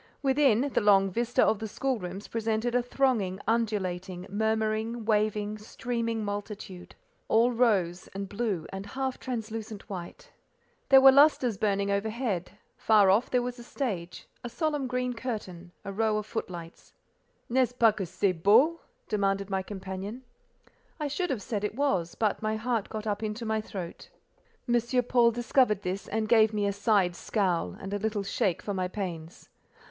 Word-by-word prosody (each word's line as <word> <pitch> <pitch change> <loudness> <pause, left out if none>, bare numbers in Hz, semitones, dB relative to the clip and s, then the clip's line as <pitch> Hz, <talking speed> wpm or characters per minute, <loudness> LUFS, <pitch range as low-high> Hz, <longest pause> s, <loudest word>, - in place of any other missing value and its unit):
Within, 265 -4 +4
the - - +2
long 195 -2 +4
vista 240 +4 +1
of 215 - +2
the 220 - -4
school 260 +3 -2
rooms 185 +2 -7
presented 225 +1 -1
a 245 - +3
thronging, 240 -7 0
undulating, 190 -5 -1
murmuring, 220 +2 -1
waving, 215 -1 0
streaming 230 0 -3
multitude, 205 -3 -6 0.3
all 230 +3 +4
rose, 195 -7 +1
and 195 0 -6
blue, 200 -5 -2
and 195 +1 -6
half 265 +3 -3
translucent 225 -4 -5
white. 175 -3 -8 0.6
There 270 -1 +8
were 270 0 +10
lustres 270 -4 +5
burning 200 -1 +1
overhead; 205 -2 -2 0.2
far 210 -3 +5
off 220 +6 +2
there 250 -1 +2
was 245 0 -5
a - - -9
stage, 200 -10 -4 0.2
a 240 - -4
solemn 290 +2 -1
green 250 0 -1
curtain, 205 -8 -6
a 200 - -5
row 215 +1 +1
of 210 - -3
footlights. 170 -5 -7 0.5
"Nest 250 0 +2
ce - - -30
pas 225 -3 +5
que 200 - -3
c'est 185 +2 +1
beau?" 260 - +5 0.3
demanded 200 -1 0
my 190 0 0
companion. 195 +4 -6 0.8
I 300 - -1
should 350 +6 -2
have 225 -7 -2
said 210 -1 -3
it 210 - -2
was, 235 -12 0
but 215 -3 0
my 215 0 0
heart 225 -1 -1
got 215 -1 -5
up 210 -1 -2
into 215 +2 -4
my 220 0 0
throat. 185 -5 -8 0.6
M. 240 +1 +2
Paul 240 -1 +4
discovered 235 -3 +2
this, 185 +2 -3
and 220 0 -1
gave 220 -1 +5
me 205 -1 +1
a 200 - 0
side 200 -3 +2
scowl 175 - -1
and 195 +1 -6
a 205 - -1
little 210 -1 -1
shake 195 -2 -1
for 205 - -3
my 185 -1 -1
pains. 175 -4 -6
215 Hz, 165 wpm, -28 LUFS, 195-240 Hz, 0.8 s, were